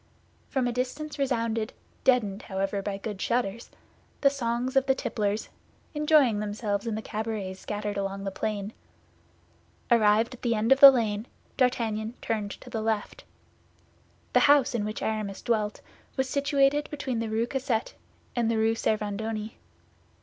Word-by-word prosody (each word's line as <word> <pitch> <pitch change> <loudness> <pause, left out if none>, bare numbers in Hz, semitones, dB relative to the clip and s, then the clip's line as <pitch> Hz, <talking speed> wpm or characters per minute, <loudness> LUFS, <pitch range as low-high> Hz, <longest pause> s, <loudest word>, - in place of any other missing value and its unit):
From 265 -3 0
a - - 0
distance 285 +5 -4
resounded, 230 -4 0 0.3
deadened, 215 -6 +2
however, 195 +1 -2
by 195 0 -3
good 205 -1 -6
shutters, 235 -2 -1 0.5
the 275 - +5
songs 250 -1 -2
of 270 0 +3
the 265 - +4
tipplers, 210 -4 -2 0.4
enjoying 295 -7 +4
themselves 205 0 -2
in 225 - -1
the 220 - -4
cabarets 210 -3 -4
scattered 210 -1 -4
along 195 0 -3
the 195 - -3
plain. 205 +1 -3 1.2
Arrived 220 +1 +4
at 250 - -12
the 235 -2 +1
end 220 +3 0
of 270 - +6
the 275 - +13
lane, 225 -3 0 0.3
D'Artagnan 230 -3 0
turned 215 -3 -2
to - - -11
the 220 - -2
left. 220 -1 -2 1.1
The - - +6
house 285 -4 +5
in 220 -3 -1
which 215 0 -4
Aramis 215 -3 -3
dwelt 215 -3 0 0.4
was 265 0 +1
situated 280 +1 +2
between 270 -5 -3
the 230 -1 -2
Rue 220 +2 +1
Cassette 250 -3 -2 0.4
and 235 -2 +1
the 230 - +1
Rue 220 +1 +3
Servandoni. 215 0 -2
225 Hz, 150 wpm, -27 LUFS, 210-255 Hz, 1.2 s, the